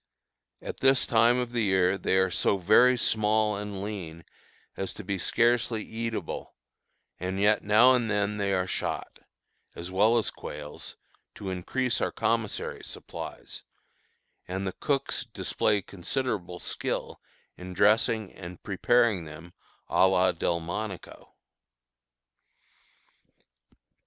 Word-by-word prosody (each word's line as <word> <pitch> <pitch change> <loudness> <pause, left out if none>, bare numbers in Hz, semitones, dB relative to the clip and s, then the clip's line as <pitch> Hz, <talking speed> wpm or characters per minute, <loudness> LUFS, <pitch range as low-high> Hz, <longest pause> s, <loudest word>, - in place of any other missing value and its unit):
At - - -6
this 135 -1 +4
time 115 +1 +4
of 125 -1 -2
the 120 -1 0
year 95 -2 +3
they 95 - 0
are 95 -1 +2
so 100 - +2
very 115 +7 +5
small 110 -1 +2
and 100 -1 -5
lean 85 -6 -6 0.5
as 95 - -4
to 110 - -7
be 95 0 -3
scarcely 120 0 +1
eatable, 115 -5 -5 0.6
and 95 +2 -3
yet 105 +1 +3
now 110 +5 +6
and 120 -3 +1
then 105 0 0
they 100 -1 0
are 95 -1 +1
shot, - - -4 0.6
as 85 +2 -7
well 105 +5 +4
as 115 - 0
quails, 75 0 -8 0.4
to 95 -2 -5
increase 115 +7 -1
our - - 0
commissary 115 -3 -1
supplies, - - -8 0.9
and 95 +2 -3
the 95 - -1
cooks 140 -2 -1
display 105 -2 0
considerable 100 -1 -3
skill - - -4 0.3
in 90 0 -8
dressing 110 +1 +3
and 90 -1 -10
preparing 105 -2 +2
them 80 +3 -11 0.3
à 95 - +4
la 95 -1 +3
Delmonico. 85 +4 -4
100 Hz, 120 wpm, -28 LUFS, 90-115 Hz, 0.9 s, now